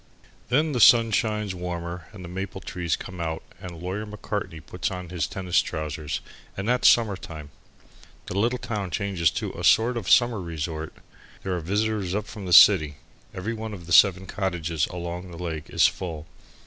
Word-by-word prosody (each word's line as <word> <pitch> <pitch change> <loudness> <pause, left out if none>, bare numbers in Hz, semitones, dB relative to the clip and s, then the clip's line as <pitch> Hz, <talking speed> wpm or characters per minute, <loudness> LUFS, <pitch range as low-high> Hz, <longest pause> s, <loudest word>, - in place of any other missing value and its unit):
Then 150 +5 +2
the 125 - -1
sun 115 0 +7
shines 105 -2 0
warmer 85 -1 -5
and 95 -3 -10
the - - -7
maple 95 +2 -5
trees 90 -2 -2
come 90 -2 -8
out 80 -1 -3 0.2
and 85 -2 -8
Lawyer 95 +4 -4
Macartney 105 -5 -5
puts 85 0 -4
on 90 -2 -6
his 85 -5 -2
tennis 90 -2 +1
trousers, 75 -2 -4 0.4
and 95 +2 -3
that's 125 +1 +3
summer 110 -4 +3
time. 75 -5 -10 0.7
The - - -6
little 120 +5 +1
town 105 -6 -4
changes 90 -3 +1
to 70 - -4
a - - -7
sort 120 +2 +4
of 105 -6 -4
summer 120 -4 +4
resort. 80 -2 -4 0.5
There 95 -1 -1
are - - -2
visitors 100 +2 -1
up 105 0 -2
from 105 -3 -8
the - - -4
city. 80 -7 +7 0.4
Every 100 +5 -4
one 110 -1 -5
of 85 -3 -11
the 85 - -3
seven 95 0 +6
cottages 85 -6 -2
along 90 0 -6
the 85 - -10
lake 80 -3 -5
is - - +4
full. 80 -4 -2
90 Hz, 185 wpm, -25 LUFS, 85-105 Hz, 0.7 s, sun